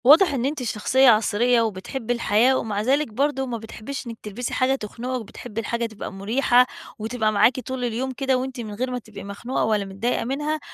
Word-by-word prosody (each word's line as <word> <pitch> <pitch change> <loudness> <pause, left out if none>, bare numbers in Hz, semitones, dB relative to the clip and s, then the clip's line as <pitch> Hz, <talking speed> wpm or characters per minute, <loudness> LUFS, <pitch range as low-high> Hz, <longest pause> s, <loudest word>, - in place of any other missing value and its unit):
واضح 300 +5 +7
إن 255 -2 0
أنتِ 280 -1 -2
شخصيّة 250 +4 +3
عصرية 230 +2 +4
وبتحبي 225 +3 -2
الحياة، 235 +2 +3
ومع 210 -4 -2
ذلك 275 +7 +2
برضه 270 +2 0
ما 245 -2 -3
بتحبيش 225 +4 -7
إنِّك 230 -1 -6
تلبسي 215 +4 -4
حاجة 260 +1 +2
تخنقِك، 250 +2 -4
وبتحبي 225 +1 -6
الحاجة 235 +1 -2
تبقى 220 -4 -7
مريحة 240 +5 +3 0.3
وتبقى 220 0 0
معاكِ 235 +4 +4
طول 260 0 -4
اليوم 245 +3 -2
كده 265 0 +1
وأنتِ 260 0 -4
من 215 -2 -6
غير 255 +5 -2
ما 250 - -2
تبقي 215 -3 -11
مخنوقة 200 +6 -3
ولا 210 -2 +1
متضايقة 195 +6 -1
منها، 295 +5 -1
240 Hz, 190 wpm, -24 LUFS, 215-260 Hz, 0.3 s, واضح